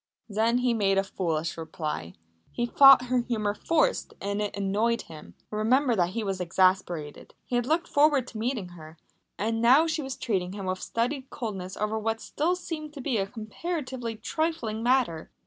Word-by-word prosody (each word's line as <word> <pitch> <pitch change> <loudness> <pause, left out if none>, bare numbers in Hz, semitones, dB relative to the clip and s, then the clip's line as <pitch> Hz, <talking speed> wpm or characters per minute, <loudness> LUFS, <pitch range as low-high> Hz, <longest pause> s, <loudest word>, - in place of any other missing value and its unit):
Then 225 +3 +1
he 250 -1 +2
made 195 -3 +2
a 195 - +3
foolish 165 -4 -2
reply. 155 - -5 0.4
He 240 - -1
thought 270 +1 +8
her 250 0 +1
humour 220 -4 -1
forced 330 - 0
and 200 +1 -2
it 205 -1 -3
annoyed 210 +4 0
him. 155 -2 -12 0.2
Remember 240 +4 +2
that 175 -3 +2
he 225 +4 -3
was 195 -2 -2
exasperated. 180 -4 0
He 245 - -3
had 245 0 0
looked 335 +3 +1
forward 290 -3 +3
to 220 - -8
meeting 225 -5 -2
her, 160 -2 -12 0.4
and 225 +4 -1
now 260 +7 +6
she 315 -1 -1
was 265 -2 -5
treating 190 -5 -1
him 200 -1 -6
with 185 0 -2
studied 260 +3 -2
coldness 190 -5 -5
over 215 +1 -1
what 225 +1 -1
still 330 +9 -1
seemed 310 -4 -6
to 290 - -9
him 250 -5 0
a 195 - -3
comparatively 250 - -5
trifling 235 -2 -2
matter. 240 -10 +1
225 Hz, 180 wpm, -27 LUFS, 195-260 Hz, 0.4 s, thought